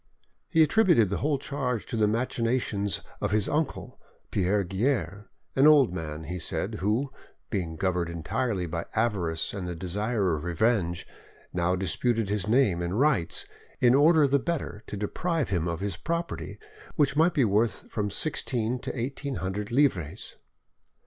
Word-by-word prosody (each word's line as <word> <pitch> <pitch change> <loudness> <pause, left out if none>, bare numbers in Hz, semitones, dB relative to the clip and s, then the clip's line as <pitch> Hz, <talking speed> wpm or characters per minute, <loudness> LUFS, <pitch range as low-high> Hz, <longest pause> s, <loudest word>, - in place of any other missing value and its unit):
He 160 - +5
attributed 160 - +4
the 100 - 0
whole 145 0 +1
charge 130 -5 -3
to 120 - -5
the 110 -2 +3
machinations 115 -3 0 0.2
of - - 0
his 105 -1 +1
uncle, 155 0 -2 0.3
Pierre 100 +2 +1
Guerre; 100 +2 -1 0.3
an 135 +2 +6
old 140 -11 +6
man, 80 -3 -5
he 90 +3 -5
said, - - -2
who, 115 +8 0 0.4
being 90 -7 -2
governed 90 0 0
entirely 90 +4 -2
by 85 0 -4
avarice 95 -8 0
and 95 -3 -4
the 90 - -4
desire 100 +2 -1
of 75 - -5
revenge, 90 -1 0 0.5
now 90 +1 +1
disputed 105 +4 0
his 105 -1 -1
name 110 -7 +3
and 90 +5 -1
rights, 135 - +2 0.3
in 120 0 +5
order 150 +2 +5
the 140 +1 +3
better 150 -9 -3
to 105 - -5
deprive 155 - -1
him 90 -3 0
of 85 0 -3
his 100 -3 -2
property, 170 +1 -3 0.4
which 145 -3 +2
might 165 +4 +3
be 135 -6 +4
worth 105 0 +1
from 105 -1 -1
sixteen 125 -1 -1
to 125 - -5
eighteen 135 +2 -3
hundred 100 +2 -3
livres. 115 - 0
105 Hz, 155 wpm, -27 LUFS, 90-135 Hz, 0.5 s, an